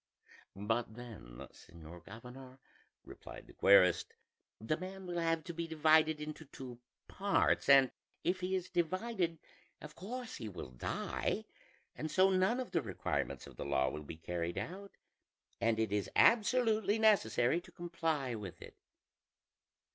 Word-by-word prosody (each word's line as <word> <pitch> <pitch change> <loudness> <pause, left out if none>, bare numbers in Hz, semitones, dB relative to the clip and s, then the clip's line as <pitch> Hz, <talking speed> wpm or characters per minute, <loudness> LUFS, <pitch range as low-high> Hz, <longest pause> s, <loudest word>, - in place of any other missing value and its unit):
"But 110 +2 -1
then, 110 - -10
señor 85 0 -13
governor," 125 +6 -11 0.5
replied - - -11
the - - -16
querist, 90 -3 +5 0.4
"the 110 +8 0
man 190 +3 -7
will 175 -1 -3
have 165 -1 +1
to 170 - -6
be 170 0 -3
divided 155 0 +4
into 155 +1 -6
two 130 -3 -9 0.3
parts; 200 -6 +1
and 135 -2 +7 0.3
if 185 +1 +1
he 185 +1 -1
is 185 -1 -2
divided, 180 0 0 0.4
of 150 0 -10
course 240 +8 -6
he 110 - -5
will 90 -9 -8
die; - - -2 0.5
and 155 - -4
so 190 +4 +4
none 190 +7 +2
of 255 -6 -4
the 170 -4 +1
requirements - - -3
of - - -14
the - - -5
law 65 -2 +1
will 75 - -6
be 75 +2 -8
carried 85 +1 -3
out, 195 +3 -5 0.7
and 115 -1 +2
it 110 -2 0
is 105 -1 0
absolutely 220 -2 +4
necessary 170 - +3
to - - -16
comply 165 -6 -2
with 105 -5 -7
it." - - -12
155 Hz, 145 wpm, -34 LUFS, 110-185 Hz, 0.7 s, and